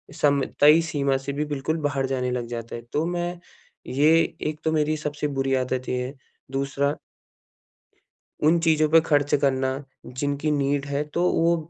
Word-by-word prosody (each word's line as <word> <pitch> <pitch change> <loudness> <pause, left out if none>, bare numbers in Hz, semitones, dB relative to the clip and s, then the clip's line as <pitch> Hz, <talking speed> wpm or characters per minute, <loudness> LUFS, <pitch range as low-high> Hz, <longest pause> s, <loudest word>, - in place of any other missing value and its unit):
समय 140 -2 +2
तय 150 +3 +7
सीमा 140 -4 0
से 140 +1 -5
भी 150 +2 -1
बिल्कुल 150 +2 -2
बाहर 140 -2 0
जाने 125 -1 -1
लग 120 -1 -3
जाता 115 -1 -6
है। 115 - -6
तो 155 +2 +1
मैं 175 0 -3 0.5
ये 145 +5 +3 0.4
एक 155 0 -6
तो 160 - +1
मेरी 155 0 +1
सबसे 150 0 -3
बुरी 135 0 +1
आदत 130 0 -2
ये 125 0 -1
है। 135 - -6 0.4
दूसरा 140 +1 0 1.5
उन 165 +2 +4
चीज़ों 155 -2 +3
पे 165 +1 +7
खर्च 145 -1 +2
करना 135 0 0 0.2
जिनकी 145 +4 -2
नीड 140 0 0
है 140 +1 -1
तो 175 - +1
वो 170 +1 +3
145 Hz, 170 wpm, -24 LUFS, 135-155 Hz, 1.5 s, तय